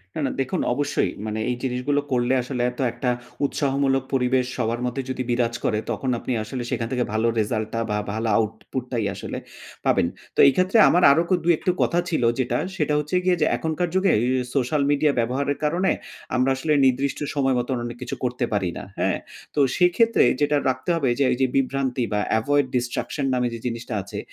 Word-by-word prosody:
না, - - -3
না। - - -1
দেখুন, 135 - -1
অবশ্যই। 145 +3 0
মানে 110 0 -3
এই 125 - 0
জিনিসগুলো 130 +3 0
করলে 125 0 +2
আসলে 125 0 -4
এত 125 - -17
একটা 120 +2 -2 0.4
উৎসাহমূলক 135 -1 +1
পরিবেশ 130 -1 +2
সবার 120 -1 -1
মধ্যে 125 +2 -2
যদি 130 0 -2
বিরাজ 120 -1 +1
করে, 105 - +1
তখন 130 - -2
আপনি - - -5
আসলে 120 +3 -5
সেখান 115 - -1
থেকে 125 -1 +1
ভালো 110 +1 +1
রেজাল্ট 110 0 -1
টা 115 - -1
বা 105 - 0 0.2
ভালো 110 +1 -2
আউটপুট 110 +3 -3
টাই 115 -4 0
আসলে 95 - -6 0.5
পাবেন। - - +3 0.3
তো - - -5
এই - - +7
ক্ষেত্রে 185 +4 +2
আমার 175 +1 +3
আরো 160 +4 +4
ক - - -6
২ 170 +1 +4
একটু 180 - +1
কথা 175 - +2
ছিল 155 -7 0 0.2
যেটা, 130 - 0 0.2
সেটা 150 -3 0
হচ্ছে 150 +4 -3
গিয়ে 180 0 +3
যে - - +5
এখনকার 160 +2 -1
যুগে 190 +1 +3
এ - - 0 0.3
সোশ্যাল 140 +2 +1
মিডিয়া 145 +1 +3
ব্যবহারের 135 +5 0
কারণে, 175 +6 +2 0.4
আমরা 130 +1 +2
আসলে 150 +4 0
নির্দিষ্ট 130 +1 +1 0.2
সময় 135 -2 +2
মত 120 - -3 0.2
অনেক 120 0 -6
কিছু 125 - -4
করতে 125 0 0
পারি 100 -3 0
না। - - -6 0.2
হ্যাঁ? - - +1 0.4
তো - - +1 0.2
সেক্ষেত্রে 210 +6 +4 0.2
যেটা 145 0 +3
রাখতে 130 +5 -3
হবে 140 -6 +1
যে - - +4
এই 125 - 0
যে 130 - +4
বিভ্রান্তি 135 -1 0
বা 105 - +1 0.2
এভয়েড 145 +5 +2
ডিস্ট্রাকশন 125 +3 -2
নামে 125 -1 +1
যে 115 - -5
জিনিসটা 120 -1 -4
আছে। 100 +2 -7
130 Hz, 200 wpm, -23 LUFS, 120-145 Hz, 0.5 s, এই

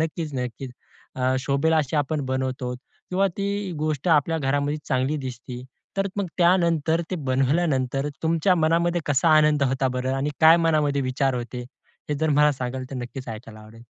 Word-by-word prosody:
नक्कीच 160 -1 -2
नक्कीच, 125 +1 -4 0.7
शोभेला 140 +4 +1
अशी 150 -1 0
आपण 145 0 0
बनवतो. 130 -1 -2 0.4
किंवा 190 +2 +2
ती 200 -1 -2
गोष्ट 155 +1 -1
आपल्या 160 0 +3
घरामध्ये 145 +1 0
चांगली 130 +4 0
दिसती. 125 -2 -7 0.3
तर 195 0 +1
मग 200 -1 -1
त्यानंतर 170 -2 +3
ते 185 - -1
बनवल्यानंतर 135 0 +1
तुमच्या 165 +3 +2
मनामध्ये 170 +1 +2
कसा 145 +3 +2
आनंद 150 -1 +4
होता 135 0 +1
बरं? 130 +1 -2
आणि 135 +2 -1
काय 160 +1 +8
मनामध्ये 145 -3 +2
विचार 130 +1 0
होते? 125 0 -5 0.5
हे 150 - 0
जर 160 +2 0
मला 150 0 +4
सांगाल, 130 -1 -4
तर 135 - -5
नक्कीच 125 +1 -7
ऐकायला 110 -1 -8
आवडेल. 110 +2 -14
145 Hz, 160 wpm, -24 LUFS, 130-160 Hz, 0.7 s, काय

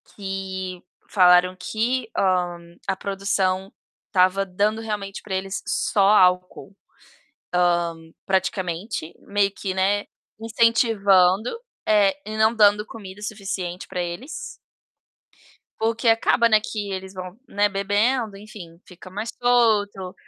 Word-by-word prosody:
que 190 -2 -5 0.3
falaram 180 -1 +5
que, 235 +5 -1
hã, 175 -2 0
a 190 - 0
produção 195 -1 -1 0.4
tava 190 +1 +3
dando 205 +4 0
realmente 205 -3 -5
pra 200 - -6
eles 190 0 -3
só 200 - 0
álcool, 180 -1 +2 1.3
ah, - - -19 0.2
praticamente 190 -1 -2
meio 200 -1 +1
que, 195 -1 -4
né, 200 +2 +1 0.4
incentivando, 220 -3 +3 0.4
é, 210 -2 +5 0.2
e 215 - -4
não 220 +1 +4
dando 210 -1 +4
comida 205 -3 -10
suficiente 195 -4 -5
pra 180 -2 -3
eles 175 - -6 1.5
o 225 +1 +1
que 230 +1 -1
acaba, 225 +1 +4
né, 215 - +5
que 210 -2 -5
eles 190 0 -5
vão, 185 +1 -8
né, 205 +1 +1
bebendo, 205 +3 0
enfim, 195 -5 -12
fica 185 0 -13
mais 210 +4 -5
solto, 210 -6 +2
195 Hz, 120 wpm, -23 LUFS, 185-215 Hz, 1.5 s, falaram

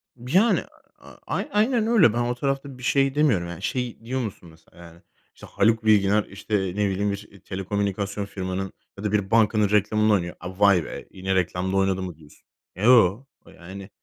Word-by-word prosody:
B 125 +1 -10
yani, 215 +6 +4 0.4
a - - -15 0.2
a - - -2 0.2
aynen 225 +1 +2
öyle. 205 - +5
Ben 120 - -1
o 120 +1 -1
tarafta 135 +1 -3
bir 125 - -13
şey 135 +1 +2
demiyorum. 130 - +2
Yani, 85 0 -8
şeyi 125 -1 -3
diyor 130 +3 -2
musun 100 -6 -7
mesela, 80 +1 -22
yani, 85 0 -16 0.3
işte, - - -13
Haluk 110 +2 +1
Bilginer, 105 -1 +4
işte, 100 +3 -5
ne 95 +2 -1
bileyim, 100 +2 -1
bir 100 0 -9
telekomünikasyon 100 +1 -3
firmanın 95 -1 -4 0.3
ya 100 - -8
da 105 - -1
bir 100 -2 -1
bankanın 110 -2 +3
reklamını 105 +1 +2
oynuyor. 90 -3 -1
A, 95 +2 -9
"Vay 100 -4 +5
be - - -8
yine 95 0 -2
reklamda 95 +1 -1
oynadı" 95 -1 +1
mı 90 -3 -6
diyorsun? 75 -2 -20 0.3
Eee, 95 - -6
yo, 115 -2 +5 0.3
yani. 95 +3 -10
100 Hz, 190 wpm, -24 LUFS, 95-120 Hz, 0.4 s, öyle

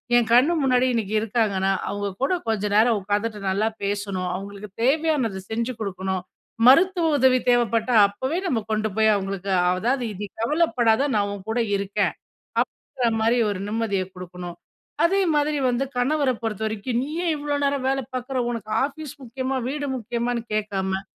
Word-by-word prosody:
என் 240 -2 +4
கண் 255 +7 +6
முன்னாடி 255 -1 +3
இன்னக்கி 215 -3 -1
இருக்காங்கன்னா, 205 -3 +1 0.2
அவுங்க 205 0 -2
கூட 320 - +2
கொஞ்ச 220 -2 0
நேரம் 220 +1 +5
உக்காந்துட்டு 210 +2 -1
நல்லா 200 +3 +1 0.2
பேசணும். 200 -2 -2
அவுங்களுக்கு 200 +2 -7
தேவையானது 275 -7 +1
செஞ்சு 235 +3 -2
குடுக்கணும். 190 -2 -3 0.5
மருத்துவ 340 +5 +5
உதவி 260 -1 +4
தேவைப்பட்டா, 235 0 +2
அப்பவே 260 - -3
நம்ம 245 -9 +1
கொண்டு 215 0 +1
போய் 220 0 +5
அவுங்களுக்கு 195 -1 -3 0.2
அதாவது 240 +9 0
இது 205 +2 -5 0.2
கவலைப்படாத 260 -2 +2
நான் 205 -1 +1
உன்கூட 220 +4 -3 0.2
இருக்கேன், 200 0 0 0.5
அப்பிடிங்கிறமாரி 230 -1 0
ஒரு 195 -2 -3
நிம்மதிய 210 -3 -1
கொடுக்கணும். 180 -1 -8 0.5
அதே 390 +4 +3
மாதிரி 295 0 +1
வந்து 245 +3 0
கணவர 285 +2 +2
பொறுத்தவரைக்கும், 220 +2 -2
நீ 275 - -4 0.2
ஏன் 325 - +2
இவ்ளோ 290 0 -2
நேரம் 280 -2 0
வேலை 270 0 0
பார்க்குற 255 +1 -3
உனக்கு 220 -3 -5
ஆஃபீஸ் 295 0 -6
முக்கியமா? 260 +2 -3
வீடு 290 0 -3
முக்கியமான்னு? 235 +1 -2
கேட்காம 195 -3 -1
225 Hz, 145 wpm, -24 LUFS, 200-260 Hz, 0.5 s, கண்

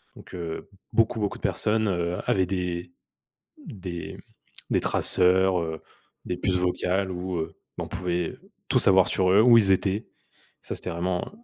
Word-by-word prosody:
Donc - - -14
heu, 85 -2 -5 0.3
beaucoup, 115 0 +2
beaucoup 105 -2 -2
de - - -20
personnes, 110 0 +1
heu, 85 -2 -1
avaient 95 -1 +3
des 90 -2 -3 0.8
des 90 -4 -6 0.5
des - - +3
traceurs, 95 0 +3
heu, 80 -1 -4 0.4
des 90 - -3
puces 90 +1 0
vocales, 90 +1 0
où 90 0 -4
heu, 80 - -4 0.2
on - - -4
pouvait 90 -2 -2 0.3
tout - - +3
savoir 95 -1 +5
sur 90 -1 +2
eux, 100 - +6
où 120 0 +8
ils 100 -3 +3
étaient. 95 +3 0 0.6
Ça - - -5
c'était 90 - -6
vraiment, 90 +1 -1
heu, - - -11
90 Hz, 165 wpm, -26 LUFS, 90-95 Hz, 0.8 s, où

